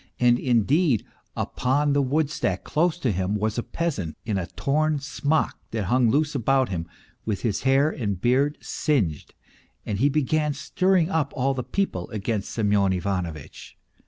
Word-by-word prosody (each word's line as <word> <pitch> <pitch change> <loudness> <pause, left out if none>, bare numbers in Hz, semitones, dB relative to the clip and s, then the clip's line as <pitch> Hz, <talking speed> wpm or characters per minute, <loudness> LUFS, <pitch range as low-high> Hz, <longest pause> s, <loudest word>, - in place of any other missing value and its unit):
And, 120 0 +4
indeed, 130 - +2 0.3
upon 140 +3 0
the 140 - +3
woodstack, 140 - 0
close 170 +2 +1
to 130 -9 0
him, 95 +2 -1
was 110 +2 -1
a - - +1
peasant, 120 - -3
in 105 -4 -1
a 85 - -4
torn 155 +2 0
smock 145 +2 -1
that 110 -2 -2
hung 120 +4 +3
loose 150 +5 +1
about 135 0 +2
him, 85 -3 -3 0.4
with 105 -3 -2
his 110 -5 0
hair 135 +4 +3
and 100 - -3
beard 135 +7 +2
singed, 100 - -1 0.5
and 100 -2 -2
he 140 +4 +4
began 150 +1 +1
stirring 180 +4 +1
up 155 -6 0
all 135 0 +1
the 130 - -2
people 125 - -2
against 105 -1 -3
Semyon 100 -3 +2
Ivanovitch. 90 -5 -4
130 Hz, 160 wpm, -25 LUFS, 100-150 Hz, 0.5 s, And